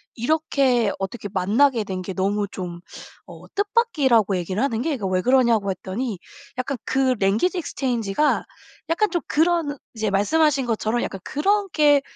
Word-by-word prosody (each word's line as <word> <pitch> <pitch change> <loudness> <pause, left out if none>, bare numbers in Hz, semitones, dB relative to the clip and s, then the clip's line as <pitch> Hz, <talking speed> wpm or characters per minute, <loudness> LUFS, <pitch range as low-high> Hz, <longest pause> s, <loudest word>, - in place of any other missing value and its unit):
이렇게 255 -4 +1
어떻게 205 +2 -5
만나게 215 +6 +2
된 185 -2 -5
게 190 - -5
너무 200 +2 0
좀 175 -2 -6 0.5
어 - - -13
뜻밖이라고 300 - +2
얘기를 185 +4 -2
하는 240 -4 0
게 320 -3 0
그 200 -5 -3
왜 185 -1 +1
그러냐고 235 -5 +3
했더니 195 +3 -4 0.4
약간 260 +1 -2
그 260 -1 +1
랭귀지 215 - +1
익스체인지가 255 - 0 0.5
약간 350 +5 +2
좀 345 -2 -1
그런 325 -2 +1 0.2
이제 220 -2 -1
말씀하신 275 +7 +2
것처럼 225 +1 0
약간 195 - -4
그렇게 305 -4 +2
240 Hz, 325 characters per minute, -23 LUFS, 200-295 Hz, 0.5 s, 그러냐고